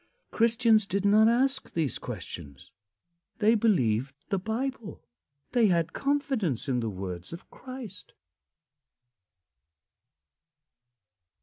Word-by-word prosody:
Christians 225 Hz, -2 st, +3 dB
did 200 Hz, +1 st, -1 dB
not 215 Hz, +2 st, +6 dB
ask 265 Hz, +3 st, +1 dB
these 160 Hz, -5 st, -1 dB
questions. 85 Hz, -, -8 dB, 0.7 s
They 220 Hz, +1 st, +4 dB
believed 135 Hz, -, +1 dB
the 195 Hz, -3 st, 0 dB
Bible; 230 Hz, +2 st, -4 dB, 0.5 s
they 240 Hz, -3 st, +4 dB
had 170 Hz, -3 st, +1 dB
confidence 270 Hz, -, -1 dB
in 130 Hz, -2 st, +1 dB
the 115 Hz, -2 st, -2 dB
words 90 Hz, -3 st, -6 dB
of 170 Hz, -, -11 dB
Christ. 255 Hz, -7 st, -10 dB
200 Hz, 95 wpm, -28 LUFS, -, 0.7 s, not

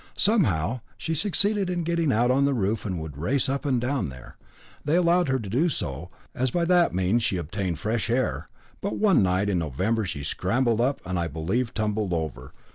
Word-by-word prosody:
Somehow, 125 Hz, -, +2 dB, 0.2 s
she 160 Hz, -, -3 dB
succeeded 200 Hz, +3 st, +1 dB
in 175 Hz, -1 st, -1 dB
getting 170 Hz, -3 st, +1 dB
out 120 Hz, +2 st, +3 dB
on 135 Hz, +2 st, +3 dB
the 140 Hz, -1 st, +1 dB
roof, 105 Hz, 0 st, -1 dB
and 90 Hz, -3 st, -3 dB
would 75 Hz, -3 st, -7 dB
race 130 Hz, -, +1 dB
up 140 Hz, +2 st, -2 dB
and 130 Hz, -3 st, +2 dB
down 125 Hz, -, -1 dB
there. 65 Hz, -1 st, -12 dB, 0.5 s
They 150 Hz, +3 st, +1 dB
allowed 175 Hz, 0 st, +3 dB
her 130 Hz, -, +2 dB
to 110 Hz, -5 st, -6 dB
do 135 Hz, -, +2 dB
so, 75 Hz, -, -4 dB, 0.2 s
as 130 Hz, +1 st, 0 dB
by 170 Hz, +7 st, 0 dB
that 175 Hz, -1 st, +4 dB
means 95 Hz, +6 st, +2 dB
she 105 Hz, -4 st, 0 dB
obtained 90 Hz, +1 st, -3 dB
fresh 110 Hz, +6 st, -2 dB
air. 130 Hz, +2 st, -1 dB, 0.3 s
But 200 Hz, -, -2 dB
one 205 Hz, -, +4 dB
night 95 Hz, +1 st, +1 dB
in 95 Hz, -3 st, +1 dB
November 95 Hz, -, -1 dB
she 70 Hz, -5 st, -5 dB
scrambled 115 Hz, -, 0 dB
up 135 Hz, +3 st, 0 dB
and, 90 Hz, -1 st, -2 dB
I 85 Hz, -, 0 dB
believe, 95 Hz, -, -2 dB
tumbled 105 Hz, -3 st, -1 dB
over. 75 Hz, -6 st, -4 dB
115 Hz, 200 wpm, -26 LUFS, 90-145 Hz, 0.5 s, that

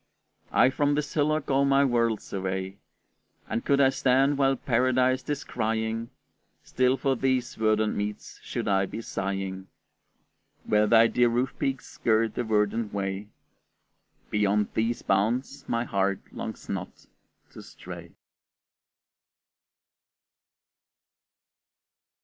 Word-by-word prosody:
I 130 Hz, -, +5 dB
from 145 Hz, +1 st, +1 dB
this 150 Hz, 0 st, -2 dB
hillock 155 Hz, -1 st, 0 dB
all 135 Hz, +1 st, +3 dB
my 140 Hz, 0 st, +4 dB
world 115 Hz, -4 st, +1 dB
survey! 95 Hz, 0 st, -4 dB, 0.7 s
And 115 Hz, +1 st, -2 dB
could 140 Hz, 0 st, +2 dB
I 135 Hz, -1 st, +6 dB
stand 135 Hz, +1 st, +2 dB
while 135 Hz, -1 st, +3 dB
Paradise 130 Hz, +1 st, +2 dB
descrying, 115 Hz, -4 st, -2 dB, 0.5 s
Still 130 Hz, +1 st, +1 dB
for 135 Hz, -1 st, +1 dB
these 130 Hz, -1 st, 0 dB
verdant 110 Hz, -1 st, +1 dB
meads 105 Hz, 0 st, -5 dB
should -, -, -4 dB
I 95 Hz, -1 st, +2 dB
be 115 Hz, -, -6 dB
sighing, 95 Hz, -1 st, -4 dB, 1.0 s
Where 105 Hz, 0 st, +2 dB
thy 115 Hz, +1 st, +6 dB
dear 120 Hz, +1 st, +3 dB
roof 125 Hz, +3 st, 0 dB
peaks 135 Hz, -1 st, -2 dB
skirt 110 Hz, -1 st, 0 dB
the -, -, -2 dB
verdant 110 Hz, 0 st, 0 dB
way: 100 Hz, 0 st, -3 dB, 1.0 s
Beyond 105 Hz, 0 st, +1 dB
these 115 Hz, +2 st, -1 dB
bounds 120 Hz, +8 st, 0 dB
my 115 Hz, 0 st, 0 dB
heart 100 Hz, -3 st, 0 dB
longs -, -, -7 dB
not -, -, -6 dB, 0.5 s
to -, -, -11 dB
stray. -, -, -10 dB
115 Hz, 115 wpm, -27 LUFS, 105-130 Hz, 1.0 s, I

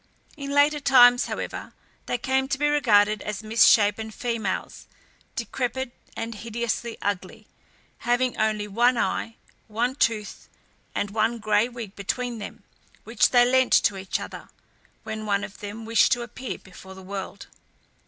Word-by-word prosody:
In 280 Hz, -2 st, -6 dB
later 290 Hz, +1 st, +3 dB
times, 245 Hz, -3 st, +6 dB
however, -, -, -5 dB, 0.3 s
they 245 Hz, -, 0 dB
came 265 Hz, +2 st, 0 dB
to 270 Hz, -, -1 dB
be 295 Hz, +1 st, +1 dB
regarded 215 Hz, -8 st, +3 dB
as 210 Hz, +1 st, -5 dB
misshapen 220 Hz, -1 st, +4 dB
females, 220 Hz, -3 st, -4 dB, 0.5 s
decrepid, 260 Hz, 0 st, -3 dB, 0.3 s
and 230 Hz, 0 st, -4 dB
hideously 235 Hz, +1 st, -3 dB
ugly, 205 Hz, +2 st, -3 dB, 0.5 s
having 245 Hz, +1 st, +1 dB
only 215 Hz, -1 st, 0 dB
one 240 Hz, +4 st, +3 dB
eye, 225 Hz, 0 st, -1 dB, 0.3 s
one 235 Hz, +4 st, -1 dB
tooth, 225 Hz, -6 st, -1 dB, 0.5 s
and 205 Hz, -, -2 dB
one 225 Hz, +2 st, +1 dB
gray 215 Hz, +1 st, +2 dB
wig 235 Hz, -5 st, -8 dB
between 235 Hz, +4 st, -3 dB
them, 205 Hz, -, -9 dB, 0.4 s
which 225 Hz, -1 st, +2 dB
they 245 Hz, -1 st, +5 dB
lent 260 Hz, 0 st, +3 dB
to 205 Hz, -, +4 dB
each 190 Hz, 0 st, -3 dB
other, -, -, -9 dB, 0.5 s
when 220 Hz, -1 st, -5 dB
one 200 Hz, -1 st, +1 dB
of 200 Hz, -, -9 dB
them 210 Hz, +2 st, -7 dB
wished 230 Hz, +3 st, +3 dB
to 240 Hz, -1 st, -2 dB
appear 255 Hz, +1 st, -6 dB
before 190 Hz, 0 st, -13 dB
the 190 Hz, -, -12 dB
world. 195 Hz, +1 st, -6 dB
225 Hz, 145 wpm, -25 LUFS, 210-245 Hz, 0.5 s, times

